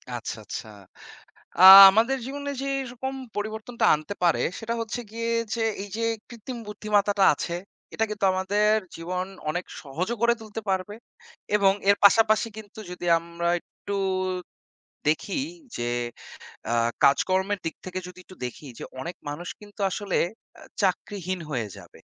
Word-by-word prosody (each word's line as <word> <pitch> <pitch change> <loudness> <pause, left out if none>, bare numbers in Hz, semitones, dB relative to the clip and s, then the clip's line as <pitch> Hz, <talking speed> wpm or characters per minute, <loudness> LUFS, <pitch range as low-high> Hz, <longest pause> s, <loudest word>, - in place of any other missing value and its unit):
আচ্ছা, 115 - -5
আচ্ছা। 105 - -6 0.9
আ - - +4 0.3
আমাদের 230 +6 +2
জীবনে 285 +1 -5
যে - - -3 0.2
এরকম 265 +1 -5 0.2
পরিবর্তনটা 220 +3 -3
আনতে 155 +6 -5
পারে 170 -2 +3 0.2
সেটা 230 +1 -3
হচ্ছে 230 +2 -3
গিয়ে 230 +1 -3 0.2
যে, 235 - -3 0.2
এই 205 - -7
যে 230 - -3 0.3
কৃত্রিম 240 +1 -8
বুদ্ধিমত্তাটা 205 -1 +1
আছে, 170 +4 -4 0.4
এটা 225 - +1
কিন্তু 210 -1 -3
আমাদের 205 +3 +2 0.2
জীবন 180 +2 -3 0.3
অনেক 175 +3 -3 0.2
সহজও 175 - -3
করে 235 0 +5
তুলতে 220 0 -7
পারবে 190 +2 -2 0.6
এবং 195 -2 +4 0.2
এর 200 - +5
পাশাপাশি 215 +2 +5
কিন্তু 215 -1 -11
যদি 180 0 -6
আমরা 170 +1 -4
একটু 200 - -8 1.1
দেখি 160 - 0 0.4
যে 120 0 -2 0.8
আ - - +2 0.3
কাজকর্মের 190 +7 +3
দিক 165 - -3
থেকে 185 0 -4
যদি 180 0 -12
একটু 185 - -15
দেখি 125 +4 -8
যে, - - -6 0.2
অনেক 170 +5 -5
মানুষ 170 +5 -6
কিন্তু 205 0 -15
আসলে 195 0 -2 0.4
অ্যা - - -15 0.2
চাকরিহীন 185 -1 -1
হয়ে 120 -6 -2
যাবে। - - -15
200 Hz, 145 wpm, -25 LUFS, 180-220 Hz, 1.1 s, করে